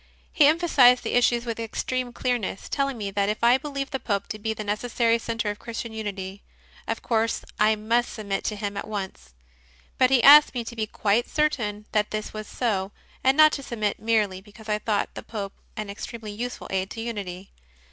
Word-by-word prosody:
He 295 Hz, -, +6 dB
emphasized 290 Hz, -6 st, +5 dB
the -, -, -3 dB
issues 240 Hz, -1 st, +3 dB
with 230 Hz, -1 st, -4 dB
extreme 245 Hz, +2 st, -3 dB
clearness, 245 Hz, -6 st, -2 dB
telling 275 Hz, -2 st, -1 dB
me 200 Hz, -2 st, -4 dB
that 200 Hz, 0 st, 0 dB
if 210 Hz, +2 st, -3 dB
I 245 Hz, +2 st, +6 dB
believed 280 Hz, -1 st, -4 dB
the 265 Hz, -, -2 dB
Pope 200 Hz, -5 st, -1 dB
to 215 Hz, -, -5 dB
be 220 Hz, +1 st, -2 dB
the 220 Hz, -1 st, -4 dB
necessary 230 Hz, +2 st, +1 dB
centre 225 Hz, -2 st, -2 dB
of 205 Hz, -, -9 dB
Christian 230 Hz, -1 st, -6 dB
unity, 200 Hz, -3 st, -5 dB, 0.5 s
of -, -, -3 dB
course 225 Hz, -1 st, 0 dB
I 215 Hz, +1 st, +4 dB
must 230 Hz, +3 st, 0 dB
submit 200 Hz, -3 st, -3 dB
to 210 Hz, -, -1 dB
him 205 Hz, -1 st, -4 dB
at -, -, -4 dB
once; 190 Hz, -, -6 dB, 0.6 s
but 255 Hz, -, +5 dB
he 255 Hz, -3 st, +4 dB
asked 295 Hz, 0 st, +9 dB
me 240 Hz, -, -1 dB
to 235 Hz, -, -8 dB
be 220 Hz, -1 st, -2 dB
quite 210 Hz, +3 st, 0 dB
certain 230 Hz, -9 st, -1 dB
that 210 Hz, -1 st, +1 dB
this 215 Hz, 0 st, -4 dB
was 215 Hz, -1 st, -6 dB
so, 200 Hz, -5 st, -1 dB, 0.3 s
and 265 Hz, +2 st, +4 dB
not 310 Hz, 0 st, +8 dB
to 280 Hz, -, -3 dB
submit 215 Hz, -6 st, -2 dB
merely 215 Hz, -4 st, +1 dB
because 215 Hz, +2 st, -14 dB
I 210 Hz, 0 st, +1 dB
thought 210 Hz, -1 st, -1 dB
the -, -, -7 dB
Pope 200 Hz, -3 st, -6 dB, 0.2 s
an 215 Hz, -1 st, -3 dB
extremely 215 Hz, +2 st, -7 dB
useful 245 Hz, +4 st, -5 dB
aid 190 Hz, 0 st, -1 dB
to 225 Hz, -, -6 dB
unity. 200 Hz, -5 st, -6 dB
220 Hz, 200 wpm, -25 LUFS, 205-245 Hz, 0.6 s, asked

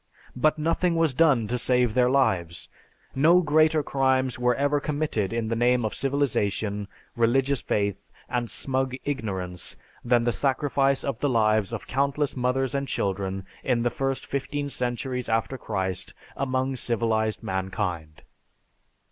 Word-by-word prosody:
But 155 Hz, +5 st, +2 dB
nothing 165 Hz, +2 st, +1 dB
was 165 Hz, -4 st, +2 dB
done 135 Hz, -7 st, +3 dB
to 125 Hz, +2 st, -1 dB
save 125 Hz, -2 st, +2 dB
their 125 Hz, 0 st, +3 dB
lives. 95 Hz, -11 st, 0 dB, 0.4 s
No 165 Hz, +6 st, +5 dB
greater 155 Hz, -1 st, +3 dB
crimes 130 Hz, -2 st, +1 dB
were 125 Hz, 0 st, +2 dB
ever 145 Hz, +2 st, +1 dB
committed 145 Hz, -9 st, -1 dB
in 115 Hz, -1 st, -1 dB
the 115 Hz, -, 0 dB
name 120 Hz, 0 st, +2 dB
of 110 Hz, -, -2 dB
civilization, 105 Hz, -7 st, -1 dB, 0.3 s
religious 130 Hz, +3 st, +2 dB
faith, 100 Hz, -1 st, -2 dB, 0.2 s
and 120 Hz, -2 st, -2 dB
smug 130 Hz, -1 st, -1 dB
ignorance 95 Hz, -10 st, -3 dB, 0.3 s
than 120 Hz, -1 st, +3 dB
the 120 Hz, -, +2 dB
sacrifice 135 Hz, +1 st, +1 dB
of 135 Hz, -4 st, -3 dB
the 145 Hz, -, +1 dB
lives 110 Hz, -4 st, +2 dB
of -, -, -5 dB
countless 140 Hz, +2 st, 0 dB
mothers 125 Hz, 0 st, 0 dB
and 140 Hz, 0 st, -1 dB
children 95 Hz, -2 st, -2 dB, 0.2 s
in 120 Hz, -3 st, +1 dB
the 120 Hz, -, +1 dB
first 135 Hz, +2 st, -2 dB
fifteen 145 Hz, +1 st, -3 dB
centuries 125 Hz, 0 st, -2 dB
after 115 Hz, +3 st, 0 dB
Christ 95 Hz, -6 st, -3 dB, 0.2 s
among 130 Hz, 0 st, -1 dB
civilized 110 Hz, -2 st, 0 dB
mankind. 95 Hz, -4 st, -3 dB
125 Hz, 140 wpm, -26 LUFS, 110-140 Hz, 0.4 s, No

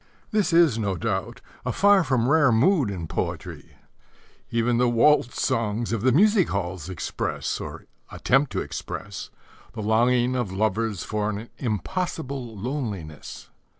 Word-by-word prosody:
This 210 Hz, -5 st, +1 dB
is, 165 Hz, -9 st, +4 dB
no 100 Hz, -3 st, -1 dB
doubt, 110 Hz, +2 st, -3 dB, 0.2 s
a 125 Hz, -, -1 dB
far 200 Hz, +5 st, +5 dB
from 130 Hz, -5 st, +1 dB
rare 145 Hz, -2 st, +4 dB
mood 135 Hz, -, +3 dB
in 90 Hz, -4 st, -4 dB
poetry. 80 Hz, -, -5 dB, 0.7 s
Even 115 Hz, +1 st, +1 dB
the 125 Hz, -1 st, +3 dB
waltz 120 Hz, +1 st, +3 dB
songs 115 Hz, +1 st, -1 dB
of 115 Hz, -, -1 dB
the 130 Hz, +3 st, +3 dB
music 200 Hz, -, +4 dB
halls 90 Hz, -3 st, -3 dB
express, 95 Hz, -, -3 dB
or -, -, -8 dB, 0.3 s
attempt 135 Hz, +2 st, +2 dB
to -, -, -1 dB
express, 95 Hz, +1 st, -6 dB, 0.4 s
the 115 Hz, -, -5 dB
longing 120 Hz, +3 st, +2 dB
of 120 Hz, -7 st, -1 dB
lovers 105 Hz, 0 st, -1 dB
for 105 Hz, 0 st, -2 dB
an 110 Hz, +2 st, -5 dB
impossible 135 Hz, -, -3 dB
loneliness. 100 Hz, -, -5 dB
115 Hz, 140 wpm, -25 LUFS, 105-135 Hz, 0.7 s, far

